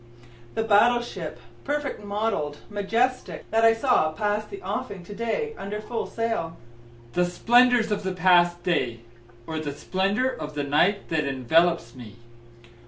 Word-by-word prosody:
The 225 - 0
battle 230 +3 +4
ship, - - -7 0.2
perfect 290 -5 -3
model'd, 200 -8 -2
majestic, 230 +5 -1
that 225 +1 +2
I 225 0 +6
saw 225 - +2
pass 210 +5 -1
the 400 - -9
offing 195 -4 -4
to 205 - -9
day 230 - -2
under 205 +2 -4
full 225 +2 -4
sail? 225 -8 -3 0.6
The 180 - +2
splendors 240 +5 +4
of 205 0 0
the 190 -1 -3
past 175 -1 +4
day? 125 -10 0 0.4
Or 160 -1 -4
the 145 -2 -4
splendor 195 - 0
of 155 -11 -5
the 145 - -1
night 175 +8 +1
that 160 -3 0
envelopes 140 +1 +2
me? 120 -4 -11
200 Hz, 150 wpm, -25 LUFS, 160-225 Hz, 0.6 s, I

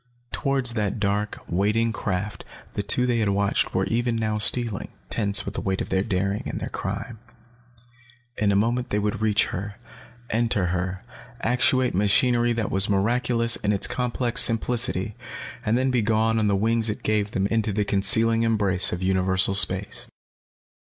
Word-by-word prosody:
Towards 135 -4 0
that 105 -1 -2
dark, 105 +1 -1
waiting 105 +5 0
craft 100 -1 -4 0.3
the - - -2
two 125 +5 +1
they 120 -2 0
had 105 -2 +1
watched 100 0 0
were - - +1
even 120 +1 -1
now 110 -1 -1
stealing, 115 -1 0 0.2
tense 100 -3 +2
with - - -5
the - - -4
weight 95 -1 -2
of - - -4
their 95 - +1
daring 100 +1 -2
and - - -4
their - - -5
crime. 115 -2 -5 1.2
In 105 -1 +1
a - - +1
moment 120 +5 0
they 105 - -1
would 105 +1 -2
reach 110 -1 +2
her, 100 +2 -5 0.6
enter 115 -4 0
her, 90 +1 -3 0.4
actuate 125 +2 +2
machinery 120 +5 +2
that 115 -3 -2
was 95 +2 +4
miraculous 115 +3 +2
in 105 - -1
its 100 -1 +1
complex 125 -1 0
simplicity, 115 -3 +1 0.5
and 125 +4 +1
be 125 -2 +1
gone 110 +1 +1
then 110 - +1
on - - +2
the 100 - +2
wings 115 +2 0
it 105 - -5
gave 105 -1 0
them 95 -1 -1
into 110 -1 0
the 105 +1 -1
concealing 110 +4 +3
embrace 100 -5 +2
of 90 +1 -4
universal 95 0 +2
space. 95 0 +2
105 Hz, 170 wpm, -24 LUFS, 100-115 Hz, 1.2 s, was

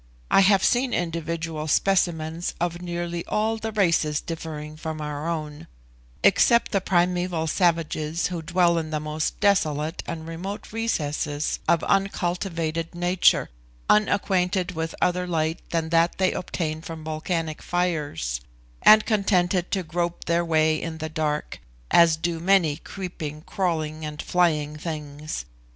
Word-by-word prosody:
I - - +6
have 195 0 +5
seen 250 0 +2
individual 165 -2 -3
specimens 170 -1 +1
of 175 0 -2
nearly 175 -1 -3
all 220 +1 0
the 220 0 -4
races 165 -7 +2
differing 155 -2 -6
from 155 0 -5
our 150 +1 -4
own, 155 -3 -5 0.6
except 235 0 +4
the 195 - +1
primeval 180 -2 +1
savages 165 -1 0
who 175 -2 -2
dwell 170 +1 +2
in 160 -1 -5
the 155 -1 -1
most 155 0 -3
desolate 160 -6 +1
and 160 -1 -5
remote 190 +6 -6
recesses 150 -9 -1
of 170 -1 +3
uncultivated 175 -4 -1
nature, 175 - +3 0.4
unacquainted 190 -3 +2
with 160 -1 -4
other 180 0 +1
light 160 -1 0
than 165 -1 -1
that 165 +1 +2
they 185 -1 +2
obtain 160 -3 -3
from 160 -1 -8
volcanic 155 0 -3
fires, 150 - -1 0.4
and 215 0 +8
contented 185 -4 +1
to 190 -2 -1
grope 170 +1 -3
their 170 0 +2
way 155 -1 +2
in 165 -1 -5
the 160 0 -4
dark, 155 -1 -2 0.3
as 165 -2 +6
do 165 0 -2
many 170 -4 +3
creeping, 155 -6 -7
crawling 160 -5 -2
and 150 -1 -6
flying 155 -4 +1
things. 150 - -5
165 Hz, 135 wpm, -25 LUFS, 155-180 Hz, 0.6 s, and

